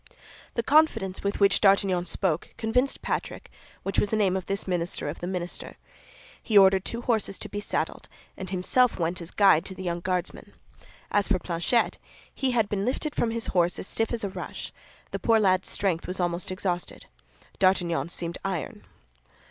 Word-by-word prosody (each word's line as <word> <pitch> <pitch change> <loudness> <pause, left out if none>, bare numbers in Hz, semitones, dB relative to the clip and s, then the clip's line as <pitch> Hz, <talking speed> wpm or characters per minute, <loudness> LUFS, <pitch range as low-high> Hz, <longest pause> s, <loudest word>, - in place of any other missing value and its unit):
The 235 - 0
confidence 225 -10 +3
with 200 0 -1
which 200 -1 +4
D'Artagnan 195 -3 +3
spoke 175 -1 -2
convinced 250 +4 0
Patrick, - - -4 0.3
which 195 - 0
was 205 - +1
the 220 - 0
name 195 -4 +2
of 190 -2 -3
this 195 0 -2
minister 175 -4 -1
of 145 - -5
the 175 - -4
minister. 180 -1 -5 0.6
He 215 - +2
ordered 190 -1 +6
two 235 +3 -4
horses 220 -5 0
to - - -6
be 205 - -4
saddled, 205 - -3 0.3
and 190 -1 -7
himself 195 +7 +2
went 170 +1 -1
as 170 - -7
guide 195 -6 +5
to 190 - -6
the 185 - -7
young 175 -1 -2
Guardsman. 180 0 -3 0.6
As 205 -1 +2
for 195 - +2
Planchet, 175 +7 0 0.3
he 265 - -1
had 230 -4 +2
been 200 -1 -2
lifted 280 +6 -1
from 235 - 0
his 230 0 -1
horse 175 -1 +2
as - - -5
stiff 225 +3 -1
as 235 -2 -2
a 200 - -1
rush; - - -7 0.4
the - - -3
poor 225 -1 +3
lad's 185 -3 +2
strength 185 -4 -1
was 185 +1 -3
almost 175 0 -1
exhausted. 185 -1 -3 0.5
D'Artagnan 175 -3 +2
seemed 170 0 -3
iron. 185 -7 -4
190 Hz, 180 wpm, -27 LUFS, 175-215 Hz, 0.6 s, ordered